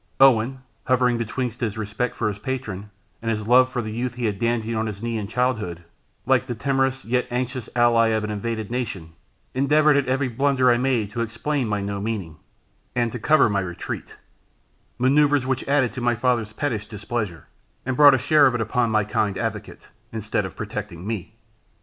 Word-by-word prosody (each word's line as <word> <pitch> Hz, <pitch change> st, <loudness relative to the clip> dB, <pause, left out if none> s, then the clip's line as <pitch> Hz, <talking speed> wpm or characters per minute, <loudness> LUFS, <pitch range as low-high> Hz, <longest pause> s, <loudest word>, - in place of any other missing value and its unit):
Owen, 130 Hz, -1 st, +4 dB, 0.2 s
hovering 125 Hz, -2 st, +2 dB
betwixt 120 Hz, +1 st, -3 dB
his 110 Hz, -3 st, -2 dB
respect 110 Hz, +3 st, -2 dB
for 110 Hz, -, -1 dB
his 105 Hz, -1 st, -3 dB
patron, 105 Hz, -5 st, -4 dB, 0.3 s
and 115 Hz, -, -2 dB
his 110 Hz, -1 st, -2 dB
love 130 Hz, +2 st, +5 dB
for 125 Hz, -1 st, -2 dB
the 110 Hz, -, -5 dB
youth 120 Hz, +2 st, -3 dB
he 120 Hz, -1 st, -3 dB
had 105 Hz, -3 st, -1 dB
dandled 115 Hz, -1 st, 0 dB
on 110 Hz, 0 st, -1 dB
his 105 Hz, 0 st, -6 dB
knee 120 Hz, -1 st, -2 dB
in 105 Hz, -3 st, -3 dB
childhood, 110 Hz, -8 st, -1 dB, 0.4 s
like 130 Hz, 0 st, +2 dB
the 120 Hz, -, -3 dB
timorous, 135 Hz, +1 st, 0 dB
yet 125 Hz, +2 st, 0 dB
anxious 125 Hz, 0 st, -3 dB
ally 120 Hz, -1 st, +4 dB
of 110 Hz, -1 st, 0 dB
an 105 Hz, -, -3 dB
invaded 110 Hz, +1 st, -3 dB
nation, 100 Hz, -10 st, -4 dB, 0.4 s
endeavoured 150 Hz, +3 st, +4 dB
at 140 Hz, -2 st, +1 dB
every 130 Hz, +1 st, +1 dB
blunder 130 Hz, +1 st, +2 dB
I 120 Hz, -, +3 dB
made 120 Hz, -5 st, 0 dB
to 115 Hz, +1 st, -3 dB
explain 115 Hz, +4 st, -2 dB
my 105 Hz, -1 st, -1 dB
no 100 Hz, 0 st, -3 dB
meaning, 100 Hz, -8 st, -4 dB, 0.6 s
and 120 Hz, -2 st, +1 dB
to 125 Hz, -, -5 dB
cover 155 Hz, +5 st, +4 dB
my 100 Hz, -2 st, 0 dB
retreat; 90 Hz, -3 st, -5 dB, 0.8 s
manoeuvres 140 Hz, +1 st, +3 dB
which 130 Hz, -1 st, -2 dB
added 140 Hz, -3 st, +2 dB
to 130 Hz, -, -5 dB
my 120 Hz, 0 st, +2 dB
father's 120 Hz, -3 st, 0 dB
pettish 110 Hz, -5 st, -2 dB
displeasure, 105 Hz, -4 st, -4 dB, 0.4 s
and 130 Hz, 0 st, -1 dB
brought 145 Hz, 0 st, +8 dB
a -, -, +2 dB
share 150 Hz, +2 st, +5 dB
of 125 Hz, -, 0 dB
it 120 Hz, -, -1 dB
upon 115 Hz, +2 st, +1 dB
my 110 Hz, -1 st, +2 dB
kind 100 Hz, -1 st, -1 dB
advocate, -, -, -5 dB, 0.2 s
instead 110 Hz, -2 st, -2 dB
of -, -, -13 dB
protecting 85 Hz, +2 st, -6 dB
me. 110 Hz, -5 st, -5 dB
120 Hz, 190 wpm, -23 LUFS, 110-130 Hz, 0.8 s, brought